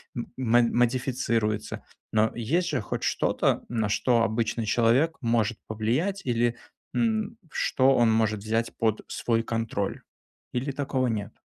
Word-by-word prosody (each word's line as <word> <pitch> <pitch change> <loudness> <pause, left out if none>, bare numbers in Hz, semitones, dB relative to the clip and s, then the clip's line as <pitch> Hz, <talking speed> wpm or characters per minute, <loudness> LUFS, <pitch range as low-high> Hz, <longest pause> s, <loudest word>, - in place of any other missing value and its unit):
м 120 - -4
модифицируются. 120 -2 +1 0.3
Но 110 0 +3
есть 165 +10 0
же 145 -7 -1
хоть - - -4
что-то, - - +1
на 110 -3 -1
что 115 +2 +2
обычный 115 0 -1
человек 120 +9 +3
может 115 -2 +1
повлиять 125 - -1
или, 120 -1 +1 0.4
м, 220 -1 0
что 135 0 +3
он 115 -2 +4
может 110 -2 +1
взять 115 +2 -1
под 110 -1 +1
свой 115 -1 0
контроль? 115 -3 -2 0.5
Или 130 +3 -1
такого 135 -2 -1
нет? 105 -3 -3
115 Hz, 130 wpm, -26 LUFS, 110-130 Hz, 0.5 s, он